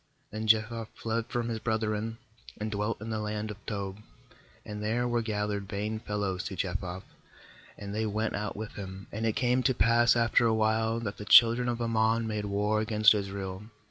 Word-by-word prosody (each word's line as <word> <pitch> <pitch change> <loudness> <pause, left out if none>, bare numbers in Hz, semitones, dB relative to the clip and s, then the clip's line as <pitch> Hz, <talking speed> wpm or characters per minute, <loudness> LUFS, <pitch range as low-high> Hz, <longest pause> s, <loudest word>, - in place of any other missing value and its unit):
8Then 110 +1 -3
Jephthah 110 +1 +2
fled 115 0 -2
from 120 -1 -2
lis 115 -1 -2
brethren, 110 0 -1 0.4
and 105 +1 -3
dwelt 105 +1 -2
in 110 +1 -5
the 110 - -1
land 105 0 -3
of 105 0 -11
Tob; 100 -2 -4 0.7
and 105 0 -6
there 115 +3 0
were 120 -1 +1
gathered 105 -2 -2
vain 105 +2 -3
JUDGES - - -22
11.23 - - -24
fellows 100 -3 -1
to 95 - -4
Jephthah, 90 0 -3 0.7
and 100 0 -7
they 110 +1 -1
went 110 +1 -1
out 105 -1 -3
with 110 0 -5
him. 95 -1 -8
4And 110 +2 -2
it 110 - +1
came 125 0 +2
to 130 0 +2
pass 120 +4 +4
after 115 0 +3
a 110 - +2
while, 110 +1 +1
that 100 -3 -4
the 105 - -7
children 120 +3 +7
of 120 -1 -2
Ammon 115 0 +1
made 105 -2 -2
war 105 +1 +1
against 110 0 +5
Israel. 100 -2 -4
110 Hz, 200 wpm, -29 LUFS, 105-115 Hz, 0.7 s, children